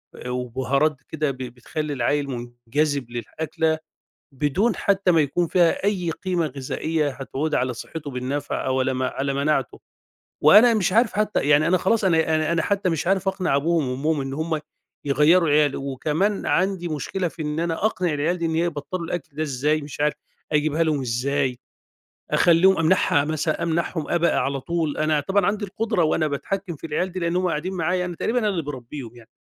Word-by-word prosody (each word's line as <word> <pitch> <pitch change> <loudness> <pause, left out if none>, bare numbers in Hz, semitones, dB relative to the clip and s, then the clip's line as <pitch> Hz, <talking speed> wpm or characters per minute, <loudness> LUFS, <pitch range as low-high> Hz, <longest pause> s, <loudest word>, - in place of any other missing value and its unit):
آآ 125 - -7
وبُهارات 130 +4 0
كده، 155 -3 -1
ب 130 - -10
بتخلّي 130 +5 -5
العيّل 140 +3 0
مُنجذِب 120 +2 -2
للأكلة 160 +6 -2 0.5
بدون 150 - +1
حتى 195 -2 +2
ما 165 - +4
يكون 165 +4 0
فيها 175 0 +2
أي 180 -5 0
قيمة 180 -1 -1
غذائية 145 +3 -2
هتعود 140 +3 -3
على 125 0 0
صِحّته 145 +4 -7
بالنفع 135 +3 -3
أو 130 0 +1
لما 130 0 0
على 135 +2 -2
مناعته، 140 -1 0 0.6
وأنا 215 +9 +8
مش 195 -3 +1
عارف 230 0 +3
حتى 210 0 +1
يعني، 150 +2 +5
أنا 185 - +4
خلاص، 220 +5 +1
أنا 160 -2 +3
أنا 155 +1 0
أنا 165 -1 +2
حتى 200 -2 0
مش 165 0 -2
عارف 195 0 +1
أقنِع 190 -7 +1
أبوهم 155 -1 +1
وأمّهم 145 +4 0
إن 135 0 -4
هُم 160 +2 -2 0.5
يغيّروا 155 +5 +4
العيال 145 -1 +3
وكمان 150 +9 -1
عندي 185 -2 +1
مشكلة 170 +4 -2
في 165 0 -8
إن 150 +1 -2
أنا 170 +4 -1
أقنِع 180 -6 0
العيال 155 +5 0
دي 170 - -2
إن 160 -1 -1
هي 165 - +2
يبطّلوا 170 +2 -4
الأكْل 160 -4 -5
ده 155 - -1
إزاي، 150 +2 0
مش 145 0 -9
عارف 150 0 +2 0.4
أجيبها 155 +1 +2
لهم 155 -3 0
إزاي، 130 +1 -1 0.7
أخلّيهم، 180 +3 +5
أمنَعها، 160 -4 +3
مثلًا 155 0 -1
أمنَعهم 165 -1 -1
أبق 170 0 +2
على 135 0 0
طول، 165 -2 -2
أنا 155 -1 +2
طبعًا 195 +7 +1
عندي 205 +1 0
القُدرة 210 -1 -1
وأنا 155 0 +2
باتحكّم 175 +5 -3
في 160 - -8
العيال 180 +4 -1
دي 185 - -4
لأن 170 0 -1
هُم 180 0 +1
قاعدين 175 +3 -2
معايا، 180 +1 0
أنا 175 - -5
تقريبًا 240 +8 0
أنا 215 -3 +1
اللي 180 -4 -1
باربّيهم 130 -3 -7
يعني، 115 -2 -16
155 Hz, 185 wpm, -23 LUFS, 140-175 Hz, 0.7 s, وأنا